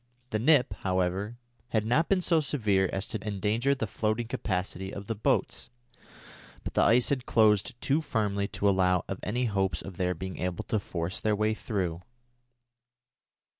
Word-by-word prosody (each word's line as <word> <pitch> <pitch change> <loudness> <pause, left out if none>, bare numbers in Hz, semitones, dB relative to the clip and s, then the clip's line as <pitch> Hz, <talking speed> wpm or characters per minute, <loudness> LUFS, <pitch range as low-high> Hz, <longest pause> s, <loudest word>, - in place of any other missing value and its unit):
The 110 - 0
nip, 125 -3 +4
however, 95 +4 -1 0.3
had 110 -2 0
not 135 +9 +2
been 195 -2 +3
so 165 -2 +3
severe 105 -10 +1
as 95 0 -1
to 110 - -4
endanger 110 +6 0
the 120 - -2
floating 110 +2 -1
capacity 95 -3 -3
of 100 0 -7
the 115 - -2
boats, 110 - -1 0.9
but - - -5
the - - +3
ice 120 +1 +4
had 130 -3 -1
closed 110 +1 +3
too 145 +4 +1
firmly 100 -8 -1
to 100 - -1
allow 90 -2 +3
of 95 - -4
any 120 +5 -1
hopes 95 -4 0
of 95 -3 -9
their 90 -1 0
being 95 +2 -6
able 90 -1 -2
to 110 - -1
force 85 -1 -4
their 110 -1 +1
way 110 +1 +1
through. 95 -7 -3
105 Hz, 170 wpm, -28 LUFS, 95-115 Hz, 0.9 s, nip